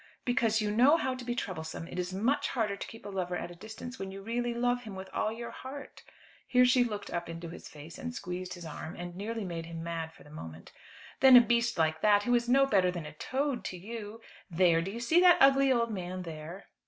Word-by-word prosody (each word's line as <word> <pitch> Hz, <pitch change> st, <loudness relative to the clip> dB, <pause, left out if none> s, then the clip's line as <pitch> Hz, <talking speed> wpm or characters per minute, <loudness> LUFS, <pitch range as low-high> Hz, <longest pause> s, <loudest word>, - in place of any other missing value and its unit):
"Because 230 Hz, -3 st, +2 dB
you 210 Hz, -1 st, 0 dB
know 255 Hz, +9 st, +5 dB
how 260 Hz, -5 st, -1 dB
to 255 Hz, -1 st, -7 dB
be 240 Hz, 0 st, -2 dB
troublesome. 165 Hz, -6 st, -5 dB
It -, -, -6 dB
is 180 Hz, 0 st, -2 dB
much 225 Hz, +10 st, +1 dB
harder 220 Hz, -5 st, -1 dB
to -, -, -7 dB
keep 225 Hz, -2 st, -12 dB
a -, -, -5 dB
lover 180 Hz, -2 st, -2 dB
at 175 Hz, -, -5 dB
a -, -, -10 dB
distance 220 Hz, +6 st, -9 dB
when 195 Hz, -, -4 dB
you 195 Hz, 0 st, -9 dB
really 240 Hz, +2 st, -1 dB
love 245 Hz, +1 st, 0 dB
him 215 Hz, -5 st, -8 dB
with 190 Hz, 0 st, -8 dB
all 215 Hz, -, 0 dB
your 235 Hz, +1 st, -6 dB
heart" 275 Hz, +2 st, -9 dB, 0.5 s
here 250 Hz, 0 st, +5 dB
she 250 Hz, 0 st, +5 dB
looked 210 Hz, -4 st, -5 dB
up 175 Hz, -1 st, -3 dB
into 165 Hz, 0 st, -6 dB
his 170 Hz, -, -10 dB
face 155 Hz, +2 st, -11 dB
and 245 Hz, -, -4 dB
squeezed 180 Hz, -5 st, -5 dB
his 175 Hz, -1 st, -10 dB
arm, 160 Hz, +1 st, -7 dB
and 175 Hz, 0 st, -7 dB
nearly 220 Hz, +3 st, -4 dB
made 165 Hz, -2 st, -5 dB
him 165 Hz, -1 st, -6 dB
mad 165 Hz, -1 st, -4 dB
for -, -, -17 dB
the 150 Hz, -, -16 dB
moment 80 Hz, -, -10 dB, 0.5 s
"than 265 Hz, -2 st, +9 dB
a -, -, +12 dB
beast 235 Hz, 0 st, +2 dB
like 160 Hz, -1 st, +1 dB
that, 205 Hz, -1 st, +5 dB
who 245 Hz, -, +1 dB
is 240 Hz, 0 st, +2 dB
no 275 Hz, +2 st, +5 dB
better 195 Hz, -8 st, +3 dB
than 175 Hz, -3 st, -4 dB
a 150 Hz, -, -8 dB
toad 265 Hz, -, -2 dB
to 185 Hz, -, -4 dB
you. 220 Hz, +3 st, -8 dB, 0.3 s
There, 170 Hz, -1 st, +3 dB
do 175 Hz, -, -4 dB
you 225 Hz, +4 st, -5 dB
see 320 Hz, +9 st, +4 dB
that 360 Hz, -1 st, +7 dB
ugly 275 Hz, 0 st, +6 dB
old 235 Hz, -2 st, +2 dB
man 185 Hz, -2 st, -4 dB
there?" 165 Hz, +3 st, -8 dB
205 Hz, 245 wpm, -30 LUFS, 175-245 Hz, 0.5 s, a